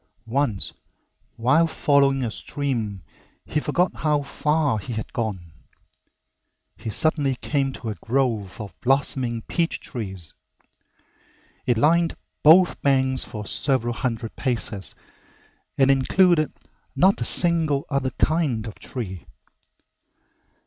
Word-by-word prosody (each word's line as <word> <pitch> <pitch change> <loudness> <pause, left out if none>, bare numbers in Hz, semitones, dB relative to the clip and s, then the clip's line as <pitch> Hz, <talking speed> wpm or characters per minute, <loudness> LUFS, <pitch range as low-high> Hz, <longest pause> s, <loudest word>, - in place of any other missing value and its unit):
Once 115 -4 -1 0.6
while 135 +8 +3
following 140 -4 +2
a 115 - -2
stream 115 -9 -3 0.4
he 150 - -1
forgot 175 +5 0
how 150 -2 +1
far 150 -3 0
he 115 +5 -6
had 110 0 -5
gone. 100 - -3 1.2
He 110 - -6
suddenly 145 +2 +2
came 135 +1 -1
to 115 - -6
a 105 - -8
grove 115 -6 -1
of 105 -2 -7
blossoming 130 -3 0
peach 170 -1 -1
trees. 95 - -6 1.3
It 120 -2 +3
lined 165 +5 +3 0.3
both 175 +4 +6
banks 130 -2 +2
for 105 -1 -7
several 120 0 0
hundred 115 -2 -3
paces 115 -6 -2 0.8
and 135 0 +5
included 155 +4 +3 0.4
not 190 +8 +4
a - - +2
single 160 -5 +2
other 140 -1 +1
kind 150 -9 +1
of 110 - -8
tree. 95 - -6
130 Hz, 115 wpm, -24 LUFS, 115-150 Hz, 1.3 s, both